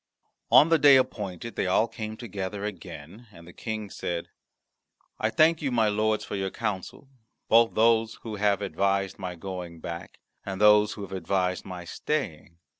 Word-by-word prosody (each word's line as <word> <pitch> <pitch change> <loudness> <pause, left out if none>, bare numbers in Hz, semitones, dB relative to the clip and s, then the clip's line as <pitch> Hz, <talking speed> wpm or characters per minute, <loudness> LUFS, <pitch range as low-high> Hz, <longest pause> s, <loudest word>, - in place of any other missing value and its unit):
On 155 - +7
the 165 -1 +4
day 140 -1 +8
appointed 115 -5 -1
they - - -1
all 100 +5 +3
came 110 -1 -6
together 105 -3 -5
again, 95 +2 -9
and 85 -4 -14
the 85 - -12
King 110 -3 -5
said, 85 -1 -4 0.9
"I 110 - +1
thank 155 +8 +3
you, 140 -3 -1
my 115 -3 +3
lords, 110 +1 0
for - - -5
your 95 -1 -2
counsel 105 +4 -5 0.4
both 115 0 +5
those 115 0 +3
who 110 -2 -5
have 100 -1 +1
advised 100 0 -1
my 90 -2 -5
going 90 -1 -7
back 85 +1 -7 0.3
and 95 -1 -5
those 105 0 +5
who 105 - -8
have 95 - -9
advised 90 0 -1
my 90 -2 -7
staying. 85 0 -4
105 Hz, 170 wpm, -27 LUFS, 95-110 Hz, 0.9 s, day